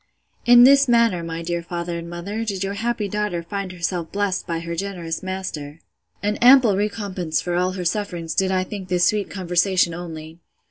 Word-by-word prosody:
In 240 Hz, 0 st, +9 dB
this 275 Hz, +2 st, +6 dB
manner, 230 Hz, -7 st, +3 dB
my 165 Hz, 0 st, -5 dB
dear 170 Hz, 0 st, -2 dB
father 170 Hz, 0 st, -4 dB
and 170 Hz, 0 st, -8 dB
mother, 195 Hz, +6 st, -4 dB
did 200 Hz, -4 st, -3 dB
your 195 Hz, +1 st, -2 dB
happy 225 Hz, 0 st, -2 dB
daughter 205 Hz, -4 st, -2 dB
find 195 Hz, +2 st, -5 dB
herself 170 Hz, -1 st, -3 dB
blessed 200 Hz, -2 st, -1 dB
by 165 Hz, -1 st, -2 dB
her 170 Hz, 0 st, -5 dB
generous 175 Hz, -3 st, -4 dB
master! 175 Hz, -6 st, -5 dB, 0.4 s
An 210 Hz, +1 st, 0 dB
ample 245 Hz, -4 st, +6 dB
recompense 200 Hz, -5 st, -2 dB
for 175 Hz, -, -3 dB
all 180 Hz, +1 st, +1 dB
her 185 Hz, -1 st, -5 dB
sufferings 175 Hz, -3 st, -2 dB
did 190 Hz, -1 st, +1 dB
I 185 Hz, -1 st, +1 dB
think 190 Hz, -1 st, -7 dB
this 180 Hz, 0 st, +2 dB
sweet 210 Hz, 0 st, +1 dB
conversation 180 Hz, -1 st, +1 dB
only. 165 Hz, -1 st, -8 dB
185 Hz, 185 wpm, -22 LUFS, 170-205 Hz, 0.4 s, In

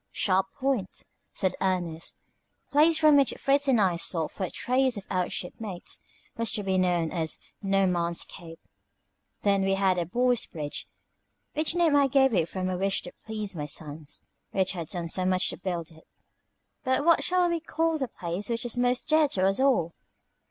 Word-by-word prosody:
"Sharp 190 Hz, -1 st, +2 dB
Point," 260 Hz, -8 st, -1 dB, 0.3 s
said 190 Hz, -, 0 dB
Ernest. 175 Hz, -4 st, -2 dB
The -, -, -46 dB
place 310 Hz, +3 st, +5 dB
from 305 Hz, -2 st, +6 dB
which 275 Hz, -2 st, +3 dB
Fritz 280 Hz, +1 st, +2 dB
and 255 Hz, -4 st, +4 dB
I 185 Hz, -4 st, +2 dB
sought 165 Hz, -2 st, -1 dB
for 190 Hz, -, -3 dB
a -, -, -5 dB
trace 255 Hz, -1 st, +1 dB
of 195 Hz, -, -7 dB
out 180 Hz, -2 st, 0 dB
ship 180 Hz, -, -3 dB
mates 195 Hz, -5 st, -6 dB, 0.4 s
was 230 Hz, -1 st, 0 dB
to 210 Hz, -, -1 dB
be 190 Hz, -1 st, +1 dB
known 175 Hz, -3 st, +1 dB
as 160 Hz, -3 st, -2 dB, 0.2 s
No 195 Hz, -1 st, +2 dB
Man's 170 Hz, -2 st, 0 dB
Cape. 165 Hz, -1 st, -11 dB, 0.8 s
Then 200 Hz, -1 st, +3 dB
we 195 Hz, 0 st, +2 dB
had 190 Hz, -1 st, +2 dB
the 170 Hz, -, -2 dB
Boys' 245 Hz, +5 st, +1 dB
Bridge, 150 Hz, -2 st, -5 dB, 0.7 s
which 315 Hz, +2 st, 0 dB
name 335 Hz, -4 st, +3 dB
I 280 Hz, -1 st, +5 dB
gave 265 Hz, -1 st, +3 dB
it 170 Hz, -4 st, +1 dB
from 185 Hz, -1 st, -3 dB
a 185 Hz, -1 st, -2 dB
wish 195 Hz, 0 st, +1 dB
to -, -, -9 dB
please 215 Hz, -3 st, -3 dB
my 150 Hz, -2 st, -4 dB
sons, 150 Hz, 0 st, -5 dB, 0.3 s
who 190 Hz, -, +2 dB
had 170 Hz, -5 st, -2 dB
done 175 Hz, -1 st, -4 dB
so 185 Hz, +3 st, -1 dB
much 185 Hz, 0 st, +2 dB
to -, -, -7 dB
build 175 Hz, -3 st, -4 dB
it. 160 Hz, 0 st, -19 dB, 0.8 s
"But 260 Hz, +2 st, +1 dB
what 335 Hz, -1 st, +5 dB
shall 360 Hz, 0 st, +2 dB
we 340 Hz, -1 st, 0 dB
call 325 Hz, 0 st, -1 dB
the 265 Hz, -, -1 dB
place 180 Hz, 0 st, -5 dB
which 235 Hz, +1 st, -2 dB
is 240 Hz, 0 st, -1 dB
most 245 Hz, 0 st, +1 dB
dear 310 Hz, -1 st, +4 dB
to 190 Hz, -9 st, 0 dB
us 195 Hz, +3 st, +2 dB
all?" 250 Hz, -12 st, +2 dB
195 Hz, 195 wpm, -27 LUFS, 175-260 Hz, 0.8 s, from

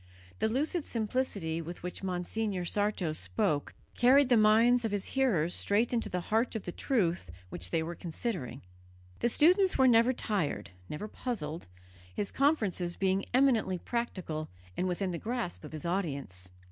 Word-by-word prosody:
The -, -, +2 dB
lucid 300 Hz, +7 st, 0 dB
simplicity 210 Hz, -8 st, -2 dB
with 170 Hz, +2 st, -8 dB
which 180 Hz, -, -5 dB
Monsignor 185 Hz, +1 st, -2 dB
Sarto 205 Hz, -4 st, 0 dB
spoke 145 Hz, +6 st, -1 dB, 0.2 s
carried 260 Hz, +2 st, +5 dB
the 245 Hz, -, +6 dB
minds 230 Hz, +3 st, +5 dB
of 225 Hz, -, 0 dB
his 205 Hz, -2 st, -1 dB
hearers 190 Hz, -12 st, +2 dB
straight 220 Hz, +5 st, +1 dB
into 230 Hz, -, 0 dB
the 180 Hz, -, -2 dB
heart 225 Hz, +2 st, +2 dB
of 220 Hz, -, -3 dB
the 175 Hz, -, -4 dB
truth 175 Hz, -, 0 dB, 0.2 s
which 90 Hz, 0 st, -4 dB
they 160 Hz, -, 0 dB
were 170 Hz, +2 st, -4 dB
considering. 165 Hz, -, -4 dB, 0.6 s
The 240 Hz, -, +2 dB
students 365 Hz, -, +4 dB
were 265 Hz, -, +5 dB
never 235 Hz, +1 st, +5 dB
tired, 185 Hz, -, -2 dB, 0.2 s
never 150 Hz, +8 st, -5 dB
puzzled, 170 Hz, -, -4 dB, 0.5 s
his 200 Hz, -, -2 dB
conferences 205 Hz, -, +1 dB
being 195 Hz, 0 st, +1 dB
eminently 245 Hz, -8 st, +3 dB
practical 180 Hz, -9 st, -3 dB, 0.3 s
and 185 Hz, -, -1 dB
within 185 Hz, +1 st, -1 dB
the 170 Hz, -, -4 dB
grasp 235 Hz, -8 st, -3 dB
of 150 Hz, -, -9 dB
his 155 Hz, +1 st, -7 dB
audience. 140 Hz, -, -3 dB
200 Hz, 160 wpm, -31 LUFS, 170-240 Hz, 0.6 s, the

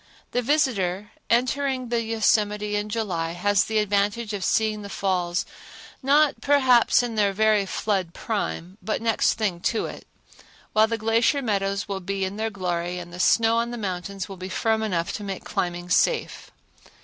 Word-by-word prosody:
The 245 Hz, -, +1 dB
visitor 210 Hz, -, 0 dB, 0.2 s
entering 255 Hz, +1 st, +1 dB
the 235 Hz, -1 st, +1 dB
Yosemite 210 Hz, -2 st, +1 dB
in 205 Hz, 0 st, -2 dB
July 180 Hz, -7 st, -2 dB
has 200 Hz, +3 st, +2 dB
the 220 Hz, -, -1 dB
advantage 210 Hz, +2 st, 0 dB
of 200 Hz, -2 st, -3 dB
seeing 215 Hz, 0 st, +1 dB
the 200 Hz, -, -8 dB
falls 180 Hz, -3 st, -1 dB, 0.6 s
not, 285 Hz, +2 st, +3 dB
perhaps, 260 Hz, -4 st, +4 dB
in 240 Hz, -1 st, -3 dB
their 205 Hz, -2 st, +2 dB
very 215 Hz, -1 st, +3 dB
flood 190 Hz, -4 st, -2 dB
prime 200 Hz, -3 st, -4 dB
but 220 Hz, -, -2 dB
next 225 Hz, -1 st, +2 dB
thing 205 Hz, -6 st, -1 dB
to 220 Hz, +5 st, 0 dB
it; -, -, -9 dB, 0.7 s
while 215 Hz, +1 st, +5 dB
the 230 Hz, 0 st, -2 dB
glacier 230 Hz, +6 st, +2 dB
meadows 200 Hz, -3 st, -1 dB
will 195 Hz, -1 st, -3 dB
be 195 Hz, +1 st, -2 dB
in 190 Hz, +2 st, -5 dB
their 220 Hz, +1 st, -1 dB
glory 180 Hz, -3 st, -3 dB
and 175 Hz, -1 st, -8 dB
the 180 Hz, -, -8 dB
snow 225 Hz, +4 st, +4 dB
on 235 Hz, 0 st, 0 dB
the 240 Hz, -, -5 dB
mountains 195 Hz, -1 st, -4 dB
will 195 Hz, -, -9 dB
be 185 Hz, +1 st, -6 dB
firm 220 Hz, +3 st, 0 dB
enough 175 Hz, -6 st, -1 dB
to 210 Hz, -, -5 dB
make 195 Hz, -2 st, -5 dB
climbing 175 Hz, 0 st, -3 dB
safe. 465 Hz, -, +1 dB
210 Hz, 175 wpm, -24 LUFS, 190-230 Hz, 0.7 s, while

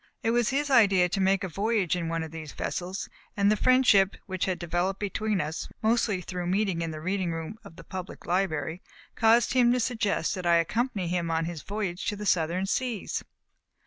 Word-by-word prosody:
It 225 Hz, -, +2 dB
was 240 Hz, -1 st, +2 dB
his 285 Hz, +1 st, 0 dB
idea 200 Hz, -7 st, +5 dB
to 195 Hz, +2 st, -1 dB
make 190 Hz, 0 st, +2 dB
a -, -, -1 dB
voyage 200 Hz, 0 st, 0 dB
in 170 Hz, -2 st, -3 dB
one 165 Hz, 0 st, -1 dB
of 160 Hz, -, -7 dB
these 160 Hz, -3 st, -8 dB
vessels, 185 Hz, +3 st, -4 dB, 0.3 s
and 200 Hz, +1 st, +4 dB
the -, -, +4 dB
friendship 215 Hz, -5 st, +4 dB
which 185 Hz, -3 st, -2 dB
had 185 Hz, -2 st, -1 dB
developed 175 Hz, +3 st, -1 dB
between 210 Hz, 0 st, -1 dB
us, 155 Hz, +1 st, -3 dB
mostly 220 Hz, -4 st, +2 dB
through 180 Hz, 0 st, -4 dB
meeting 190 Hz, -2 st, 0 dB
in 165 Hz, -, -2 dB
the 155 Hz, -1 st, -6 dB
reading 185 Hz, +1 st, -1 dB
room 165 Hz, +6 st, -5 dB
of 200 Hz, -6 st, -13 dB
the 165 Hz, -, -12 dB
Public 185 Hz, 0 st, -8 dB
Library, 175 Hz, -2 st, -1 dB, 0.3 s
caused 230 Hz, +1 st, +4 dB
him 245 Hz, -2 st, +5 dB
to 250 Hz, -, +1 dB
suggest 220 Hz, -8 st, 0 dB
that 185 Hz, -2 st, -5 dB
I 170 Hz, -, +5 dB
accompany 200 Hz, +3 st, 0 dB
him 170 Hz, -1 st, -1 dB
on 165 Hz, 0 st, 0 dB
his 165 Hz, -2 st, -5 dB
voyage 200 Hz, -3 st, -4 dB
to 215 Hz, -, 0 dB
the 210 Hz, +1 st, -6 dB
Southern 175 Hz, 0 st, +1 dB
seas. 235 Hz, +1 st, -2 dB
190 Hz, 205 wpm, -27 LUFS, 170-215 Hz, 0.3 s, idea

